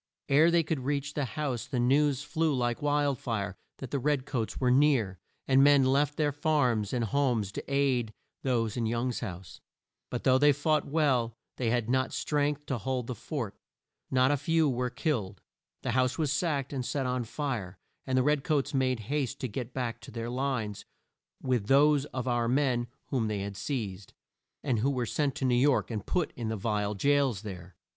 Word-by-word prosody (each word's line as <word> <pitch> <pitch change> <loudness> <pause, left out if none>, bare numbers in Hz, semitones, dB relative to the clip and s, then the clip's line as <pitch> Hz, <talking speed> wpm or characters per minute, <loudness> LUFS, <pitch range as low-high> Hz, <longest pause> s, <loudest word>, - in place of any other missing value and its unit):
Ere 150 +4 +6
they 170 -1 +3
could 155 -2 -2
reach 140 +2 -2
the 145 - -1
house, 130 0 -3
the 130 -2 -2
news 140 +2 +3
flew 160 -1 0
like 120 -2 -1
wild 145 -2 +1
fire 105 -8 -3 0.2
that 135 - -8
the 140 - 0
red 140 0 0
coats 120 -6 -3
were 125 -1 +2
near, 125 - +3 0.3
and 135 0 +5
men 140 -2 +6
left 140 +2 +2
their 150 -2 +2
farms 130 -8 +1
and 120 -2 0
homes 120 -5 +1
to - - -5
aid 130 -5 +1 0.3
those 115 -5 0
in 115 -2 0
Young's 120 +2 -1
house. 95 -6 -7 0.5
But 125 - -4
though 130 0 +4
they 145 +1 +6
fought 150 +1 +1
well, 130 -7 +1 0.2
they 120 -3 0
had 120 -1 0
not 130 +2 +1
strength 145 0 0
to 130 -4 -2
hold 125 +3 -2
the 125 - -4
fort. 120 -2 -5 0.5
Not 130 +1 +3
a 145 - +2
few 160 +2 +2
were 125 -2 0
killed. 120 - -2 0.4
The - - -1
house 130 0 +1
was 155 -4 0
sacked 145 -4 -1
and 130 -2 -2
set 135 +2 -2
on 125 -1 -1
fire, 115 -8 -4 0.3
and 130 -1 +1
the 130 - +4
red 150 0 +2
coats 150 -4 0
made 130 -3 +1
haste 135 +3 -2
to 130 - -1
get 120 +2 -5
back 120 -3 -3
to - - -11
their 115 0 -5
lines 125 -6 -2 0.6
with 125 -6 0
those 145 +1 +5
of 130 -3 -5
our 120 -1 +1
men 125 -2 +1 0.2
whom 120 -5 0
they 105 -2 -2
had 100 0 -5
seized, 100 -6 -4 0.5
and 125 -6 +1
who 130 +6 +2
were 130 -3 -1
sent 140 +3 -1
to 135 - -2
New 125 - +3
York 130 +1 +3
and 105 -3 -4
put 180 -3 0
in 120 -2 -4
the 110 - -2
vile 105 0 -1
jails 135 -2 +2
there. 90 -4 -8
130 Hz, 195 wpm, -29 LUFS, 115-145 Hz, 0.6 s, Ere